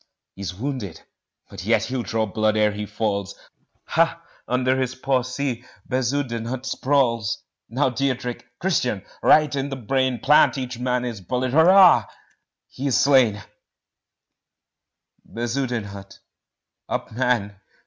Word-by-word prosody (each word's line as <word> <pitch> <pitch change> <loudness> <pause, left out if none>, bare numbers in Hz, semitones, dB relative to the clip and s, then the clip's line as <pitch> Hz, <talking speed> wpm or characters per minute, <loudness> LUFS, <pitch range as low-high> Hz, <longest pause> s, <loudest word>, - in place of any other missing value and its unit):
He's 95 -2 -6
wounded 120 - -5 0.4
but - - -9
yet - - +2
he'll 130 -1 -3
draw 115 -1 -1
blood 110 +1 0
ere 105 0 +3
he 105 0 -5
falls 100 -3 -2 0.5
Ha! - - +2 0.3
under 130 +1 +1
his 130 -1 -2
paw 130 -1 +1
see 130 -1 -3 0.2
Bezudenhout 130 -1 -2
sprawls 120 -7 0 0.3
Now 130 +2 +1
Diederik! 125 -1 -2 0.2
Christian! 125 - -1 0.2
right 150 -1 +4
in 140 0 -2
the 135 - -4
brain 130 +1 0
Plant 145 +3 +4
each 125 -2 -5
man 125 0 0
his 115 -5 -5
bullet 125 +7 -2
Hurra! 165 - +6 0.6
he 140 - -5
is 130 - +2
slain! 125 -8 +4 1.8
Bezudenhout 115 -5 -4 0.7
up, - - -3
man! 115 -4 0
125 Hz, 120 wpm, -23 LUFS, 110-135 Hz, 1.8 s, Hurra